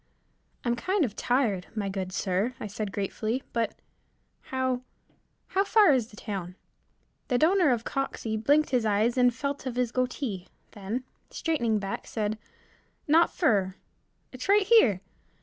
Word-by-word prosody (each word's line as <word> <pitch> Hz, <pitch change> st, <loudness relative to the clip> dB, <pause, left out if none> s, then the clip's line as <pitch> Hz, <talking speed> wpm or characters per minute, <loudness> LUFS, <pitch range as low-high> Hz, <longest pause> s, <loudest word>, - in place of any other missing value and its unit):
"I'm 240 Hz, 0 st, +2 dB
kind 370 Hz, -, +1 dB
of 215 Hz, -4 st, -6 dB
tired, 235 Hz, -8 st, 0 dB
my 205 Hz, -2 st, -2 dB
good 190 Hz, -1 st, -3 dB
sir," 195 Hz, +6 st, -1 dB
I -, -, -5 dB
said 210 Hz, 0 st, -4 dB
gratefully, 215 Hz, +5 st, -2 dB
"but 230 Hz, -1 st, -1 dB, 0.7 s
how 260 Hz, -1 st, -1 dB, 0.7 s
how 385 Hz, +1 st, +2 dB
far 405 Hz, -5 st, +5 dB
is 245 Hz, -5 st, +1 dB
the 215 Hz, -, -15 dB
town." 190 Hz, -4 st, -5 dB, 0.7 s
The 250 Hz, -, +2 dB
donor 345 Hz, +2 st, +4 dB
of 235 Hz, -3 st, +1 dB
Coxey 235 Hz, -5 st, -3 dB
blinked 290 Hz, +8 st, +2 dB
his 250 Hz, -3 st, +2 dB
eyes 215 Hz, +2 st, +2 dB
and 250 Hz, -1 st, +4 dB
felt 280 Hz, +2 st, -4 dB
of 245 Hz, -, -4 dB
his 250 Hz, -2 st, 0 dB
goatee, 250 Hz, -7 st, -2 dB, 0.2 s
then, 210 Hz, +5 st, -4 dB, 0.3 s
straightening 235 Hz, -10 st, 0 dB
back, 195 Hz, -1 st, -4 dB
said, 215 Hz, -1 st, -2 dB, 0.7 s
"Not 325 Hz, +3 st, +5 dB
fer, 200 Hz, -, +1 dB, 0.6 s
it's 255 Hz, +8 st, -7 dB
right 410 Hz, 0 st, +6 dB
here. 265 Hz, -, +5 dB
240 Hz, 150 wpm, -28 LUFS, 210-275 Hz, 0.7 s, right